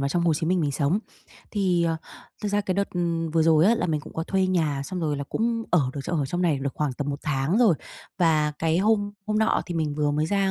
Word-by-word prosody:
vào 140 - 0
trong 170 +4 0
Hồ 170 -2 +3
Chí 160 +2 -2
Minh 180 +1 +2
mình 145 -3 0
sống. 145 +7 +1 0.5
Thì, 185 -5 +1
ờ, 165 -1 0 0.5
thực 210 - -1
ra 205 0 +1
cái 190 -2 -2
đợt, 200 +1 -1
ừm, 170 -2 -1
vừa 160 0 +2
rồi 160 0 +5
á, 225 - +5
là - - -1
mình 155 -3 0
cũng - - -12
có 160 - -3
thuê 190 +1 +1
nhà 155 -7 0
xong 185 +4 -4
rồi 150 -3 -1
là 140 - -4
cũng 230 - -1
ở 175 - +5
được 140 - -5
ở 155 -6 0
trong 175 +6 -2
này 160 -6 +2
được 135 0 -3
khoảng 150 -3 -1
tầm 145 +3 -3
1 140 - -4
tháng 150 +6 0
rồi. 225 -8 +5 0.4
Và 155 -4 +3
cái 160 +1 +1
hôm 205 0 +2
hôm 215 0 0
nọ 220 - +2
thì 175 - -5
mình 155 -3 -1
vừa 150 0 +1
mới 150 +2 0
ra 195 +1 +1
165 Hz, 275 wpm, -25 LUFS, 150-190 Hz, 0.5 s, rồi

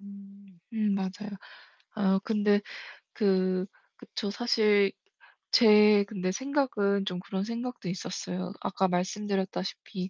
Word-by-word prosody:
음, 200 +1 -5
맞아요. 195 +2 -4 0.7
아 195 -2 +2
근데 210 -2 +2 0.5
그 185 -2 +1 0.3
그쵸. 205 - -5
사실 210 -3 +3 0.6
제 210 -2 +7
근데 185 -3 -2
생각은 210 -6 0
좀 180 -3 -3
그런 190 +1 -4
생각도 235 -2 -5
있었어요. 180 0 -4
아까 190 0 0
말씀드렸다시피 190 0 -3
200 Hz, 220 characters per minute, -28 LUFS, 190-210 Hz, 0.7 s, 제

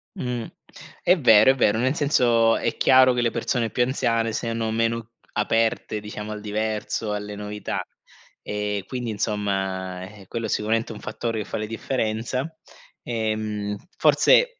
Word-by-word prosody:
Mh, 125 -2 -3 0.6
è 180 +1 +5
vero, 110 -1 +7
è - - -1
vero, 110 -4 +3
nel 130 +5 +1
senso, 120 -6 +3
è - - -1
chiaro 130 -1 +6
che 120 - 0
le 115 - +1
persone 115 0 -1
più 125 - +1
anziane 115 -3 0
siano 115 -1 -2
meno 115 0 -1 0.2
aperte, 110 0 0
diciamo, 105 0 -7
al 105 -1 -6
diverso, 110 0 -2
alle 105 0 -4
novità; 105 0 -4 0.6
e 105 -1 -2
quindi 125 -3 -3
insomma, 95 -3 -2
eh 100 0 -12
quello 115 -1 -3
sicuramente 110 +2 0
è - - -7
un - - -10
fattore 115 +1 -3
che 105 - -3
fa - - -4
la 110 - -2
differenza. 115 +3 -2 0.6
Ehm, 110 -3 -2 0.2
forse - - +4
110 Hz, 150 wpm, -24 LUFS, 105-120 Hz, 0.6 s, vero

